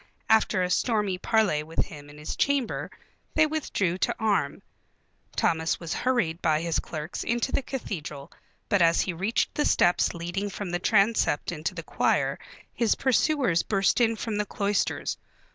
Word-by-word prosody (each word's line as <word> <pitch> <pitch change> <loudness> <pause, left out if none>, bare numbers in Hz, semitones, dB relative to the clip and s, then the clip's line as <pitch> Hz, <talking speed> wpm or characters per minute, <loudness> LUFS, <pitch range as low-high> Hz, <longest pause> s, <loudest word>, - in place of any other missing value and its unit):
After 215 -3 +4
a 180 - -1
stormy 205 -3 +1
parley 210 -8 +2
with 160 +2 -2
him 145 -1 -11
in 145 - -13
his 150 - -5
chamber 280 -4 0 0.5
they 315 - +5
withdrew 205 - -1
to - - +1
arm. 200 -10 0 0.7
Thomas 160 0 +1
was 170 -1 -4
hurried 210 -11 0
by 155 -2 +2
his 165 -1 0
clerks 155 +1 -5
into 240 +3 -1
the - - +1
cathedral, 155 - -6 0.4
but 200 -4 +2
as 165 0 +4
he 185 - -2
reached 195 +7 0
the 295 - 0
steps 175 -9 +3
leading 175 +4 -3
from 195 -2 -5
the 175 - -1
transept 200 -6 +2
into 165 +3 -4
the 165 - -5
choir - - 0 0.3
his 230 -3 +2
pursuers 260 - +2
burst 195 +3 +1
in 230 -1 +3
from 220 -1 -3
the 210 - 0
cloisters. 200 -1 -1
195 Hz, 160 wpm, -27 LUFS, 165-225 Hz, 0.7 s, they